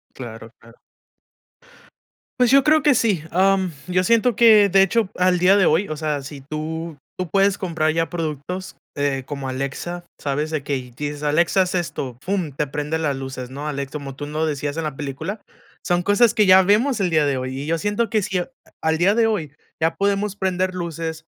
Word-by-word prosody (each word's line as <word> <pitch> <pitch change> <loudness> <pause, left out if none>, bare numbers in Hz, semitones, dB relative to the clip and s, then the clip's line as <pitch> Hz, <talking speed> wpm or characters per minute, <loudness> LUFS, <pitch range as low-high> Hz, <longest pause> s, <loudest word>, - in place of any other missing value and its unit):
Claro, 115 -3 -9
claro. 115 0 -18 1.6
Pues 250 -2 +4
yo 275 +1 +5
creo 310 -1 +4
que 290 -2 +5
sí. 205 -9 +1
Am, 190 0 +2 0.2
yo 185 0 +1
siento 230 +3 +3
que, 215 -3 +7
de 195 0 +4
hecho, 195 +1 +2
al 180 0 +2
día 185 +3 +5
de 195 -3 +4
hoy, 170 +6 +2
o 155 - -4
sea, 150 -2 -2
si 140 0 -9
tú, 155 +2 -5 0.2
tú 185 -2 -3
puedes 195 +1 +3
comprar 160 -4 0
ya 165 0 0
productos 165 0 -5 0.2
eh, 140 -2 -1
como 140 -2 -5
Alexa, 140 +7 -4 0.2
sabes 145 +1 -2
de 155 -2 -1
que 145 +1 -4 0.2
dices: 145 +3 -5
"Alexa, 170 +6 +2
haz 185 0 -1
esto". 140 -7 -3
Fum, 185 -4 -2
te 145 +2 -2
prende 150 +3 -2
las 145 -4 0
luces, 130 -2 -6
¿no? 145 +3 -5
Alexa, 140 -2 -4
como 135 -2 -8
tú 145 - -5
lo 155 +2 -1
decías 145 -1 -2
en 165 - -3
la 150 -3 -4
película, 145 +9 -5 0.4
son 175 -1 0
cosas 210 +4 +4
que 210 - +3
ya 190 0 +8
vemos 215 +6 +2
el 185 -3 +1
día 155 -2 +3
de 140 -2 0
hoy. 130 +1 -4
Y 145 - -6
yo 165 +1 +1
siento 205 +5 -1
que 215 0 +1
si 190 -1 -1
a 180 - -5 0.3
al 160 0 +1
día 190 +6 +3
de 230 -1 +3
hoy 165 -10 -2 0.3
ya 165 +1 +1
podemos 200 0 0
prender 185 -1 -1
luces, 165 -2 -4
165 Hz, 205 wpm, -21 LUFS, 145-195 Hz, 1.6 s, ya